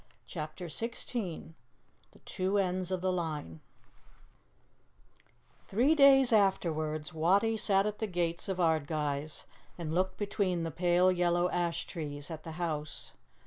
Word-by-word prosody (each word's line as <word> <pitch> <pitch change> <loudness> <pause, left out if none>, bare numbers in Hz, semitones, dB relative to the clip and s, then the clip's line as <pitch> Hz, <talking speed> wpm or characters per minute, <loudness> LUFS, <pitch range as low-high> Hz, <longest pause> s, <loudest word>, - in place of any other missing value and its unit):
CHAPTER 155 +2 -6
XVI 210 -2 -4 0.6
THE - - -20
TWO 190 +1 -1
ENDS 185 -2 0
OF 185 -1 -2
THE 185 0 +1
LINE 155 - -3 2.1
THREE 245 +10 +3
days 270 -4 +6
afterwards 155 -6 +1
Wattie 195 +8 +3
sat 200 -2 +2
at 210 0 -3
the 220 - -1
gates 175 -1 -2
of 190 - -1
Ardguys 155 -3 -1 0.3
and 160 -3 -4
looked 185 +2 0
between 200 -4 -1
the 165 - -3
pale 180 +2 +3
yellow 175 0 +1
ash 175 -1 -1
trees 145 -2 -6
at 160 -1 -6
the 160 0 -8
house. 155 -3 -4
175 Hz, 130 wpm, -31 LUFS, 160-195 Hz, 2.1 s, days